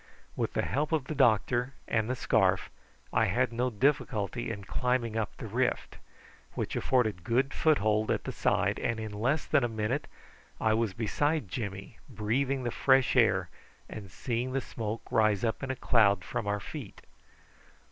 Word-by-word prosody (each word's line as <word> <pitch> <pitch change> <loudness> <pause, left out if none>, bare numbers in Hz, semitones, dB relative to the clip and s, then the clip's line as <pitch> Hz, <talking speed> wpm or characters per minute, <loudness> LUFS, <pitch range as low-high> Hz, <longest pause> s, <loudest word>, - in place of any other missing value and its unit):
With - - -2
the - - 0
help 150 +4 -1
of 150 -5 +1
the 155 - -4
doctor 125 0 +2
and 110 0 0
the 130 - 0
scarf 95 -6 +2 0.4
I - - +4
had 120 +4 +1
no 125 +2 0
difficulty 120 -2 0
in 105 -3 -5
climbing 125 +1 -1
up 110 -2 -2
the - - -7
rift, 120 +4 -1 0.5
which - - -3
afforded 110 -9 +1
good 130 +7 +1
foothold 110 -8 +2
at - - 0
the - - -4
side, - - +1
and 115 -1 -1
in 110 -1 -5
less 125 +9 0
than 135 - +2
a - - +2
minute 110 +6 -2 0.5
I 110 - +2
was 110 -3 0
beside 145 - 0
Jimmy, 100 0 -6
breathing 130 +5 -1
the 120 - -1
fresh 130 +1 +3
air 95 -8 +3 0.4
and 100 -3 -8
seeing 125 +5 -3
the 135 - 0
smoke 115 -2 -5
rise 110 -2 +3
up 115 -2 -1
in 135 - -4
a 130 - -1
cloud 100 -6 +3
from 105 - -3
our 105 0 0
feet. - - -9
115 Hz, 170 wpm, -30 LUFS, 105-130 Hz, 0.5 s, I